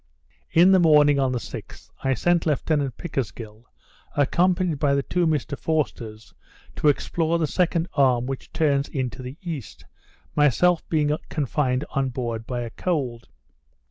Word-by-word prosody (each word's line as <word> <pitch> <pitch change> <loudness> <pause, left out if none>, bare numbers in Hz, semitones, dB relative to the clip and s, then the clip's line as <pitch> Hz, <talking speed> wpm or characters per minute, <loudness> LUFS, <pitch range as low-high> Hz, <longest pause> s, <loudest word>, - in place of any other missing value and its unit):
In 175 +3 +5
the 190 - +6
morning 150 -4 +5
of 135 -1 +1
the 125 - -1
6th, - - -9
I 135 0 +1
sent 170 +7 +1
Lieutenant 145 -3 0
Pickersgill, 115 -7 -5 0.5
accompanied 175 +2 +2
by 140 -1 +2
the 140 - 0
two 175 +2 0
Mr 150 -2 -1
Forsters, 120 -9 -3 0.4
to - - +1
explore 165 +3 +1
the 165 - +1
second 170 +1 0
arm 130 -4 +3
which 135 0 -6
turns 145 -3 +1
in 130 -3 -2
to 130 - -10
the 130 +3 -8
east, 160 - -7 0.5
myself 155 +4 +3
being 150 -2 +2
confined 135 -2 -1
on 135 -2 0
board 120 -3 -4
by 125 -1 -3
a 115 -1 -5
cold. 130 - -3
145 Hz, 150 wpm, -24 LUFS, 125-160 Hz, 0.5 s, the